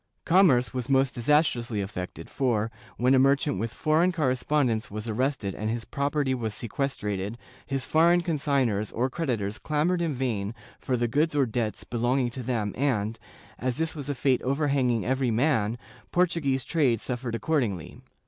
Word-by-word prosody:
Commerce 165 -9 +4
was 125 0 -3
most 135 -1 +3
disas 150 +6 +4
trously 120 -8 -2
affected 95 -2 -6
for, 115 -4 0 0.3
when 125 +2 +3
a 130 - +5
merchant 140 -4 +3
with 115 +1 -2
foreign 160 +8 +2
correspondents 130 -6 0
was 105 +2 -6
arrested 115 -3 -1
and 110 +1 -3
his 115 0 -3
property 140 -1 0
was 115 -4 -3
sequestrated, 105 -5 -3 0.3
his 135 -1 -2
foreign 170 +2 +4
con 165 -3 -1
signors 125 -8 +1
or 125 +3 -1
creditors 115 -10 -2
clamored 160 +4 0
in 160 -4 -1
vain 115 -5 -2 0.2
for 125 - -1
the 120 0 +1
goods 150 +6 +1
or 140 -2 +4
debts 115 -2 -2
belong 120 +3 0
ing 125 -2 +1
to 130 - -6
them 115 -5 -2
and, 115 -5 0 0.4
as 125 0 -1
this 160 0 0
was 145 -2 -6
a 145 - -1
fate 130 0 +2
overhanging 135 -4 +1
every 130 0 +1
man, 115 -2 +1 0.3
Portu 175 -2 +2
guese 135 -2 0
trade 135 -9 +2
suffered 120 -1 -3
accordingly. 115 - -2
130 Hz, 170 wpm, -27 LUFS, 115-145 Hz, 0.4 s, a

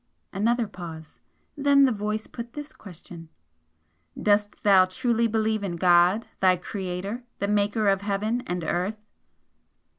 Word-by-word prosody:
Another 230 +4 +1
pause. 165 -4 -10 0.4
Then 280 -1 +4
the 260 - +2
voice 215 0 -3
put 235 -1 -9
this 295 +1 -8
question 170 -3 -12 0.9
"Dost 205 0 +1
thou 195 -2 +6
truly 230 +4 0
believe 220 -1 0
in 180 -3 -3
God, 175 +5 +4
thy 185 -1 +4
Creator, 190 +5 -5
the 200 - -2
Maker 205 +1 +1
of 195 -1 +2
heaven 210 +4 -1
and 180 -1 -3
earth?" 200 +6 -2
205 Hz, 130 wpm, -25 LUFS, 185-225 Hz, 0.9 s, thou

